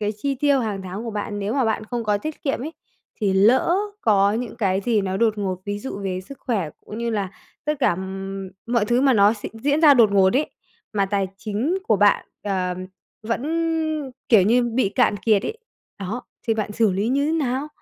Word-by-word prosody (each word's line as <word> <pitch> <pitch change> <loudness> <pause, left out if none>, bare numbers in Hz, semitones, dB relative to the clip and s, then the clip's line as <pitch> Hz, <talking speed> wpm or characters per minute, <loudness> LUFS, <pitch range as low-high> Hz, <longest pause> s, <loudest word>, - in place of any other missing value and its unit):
cái 210 0 -1
chi 275 +4 -1
tiêu 280 0 +2
hàng 205 -4 -3
tháng 190 +5 -6
của 230 - -4
bạn 205 0 -4
nếu 205 +2 -2
mà 265 -3 +2
bạn 220 -1 0
không 235 0 -4
có 205 -1 +1
tiết 310 +4 -6
kiệm 275 -4 -1
ấy 315 +3 -5 0.5
thì 200 -2 +2
lỡ 245 - +4 0.2
có 200 -2 +3
những 235 +1 -4
cái 195 -4 +1
gì 220 0 +1
nó 190 -1 -2
đột 220 -1 +2
ngột, 185 -2 -2
ví 205 0 -3
dụ 225 -4 -6
về 185 -1 -2
sức 275 +9 -12
khỏe 195 - -1 0.2
cũng 215 - -7
như 235 0 -1
là 200 -4 -2 0.3
tất 300 +1 +1
cả, 245 - +4
ừm, 195 +1 -5 0.2
mọi 235 -3 +2
thứ 240 +3 +2
mà 270 -1 +4
nó 205 -1 +5
s 210 - -10
diễn 285 +7 0
ra 300 -3 +8
đột 225 -5 +5
ngột 190 0 +5
ấy, 295 +3 +1 0.4
mà 200 -2 +1
tài 195 -1 0
chính 230 - -1
của 215 - +5
bạn, 205 +1 +3 0.2
ờ, 185 -3 -1 0.5
vẫn, 230 +2 -2 0.9
kiểu 215 -6 +7
như, 240 +5 +4
bị 240 -2 +1
cạn 210 -1 +2
kiệt 210 -2 +2
ấy, 450 - -4 0.4
đó, 205 +6 -4 0.3
thì 225 - +3
bạn 210 -1 -2
xử 215 -3 +2
lý 200 +5 0
như 280 +3 +1
thế 315 - 0
nào? 280 -2 -1
215 Hz, 220 wpm, -23 LUFS, 200-250 Hz, 0.9 s, ra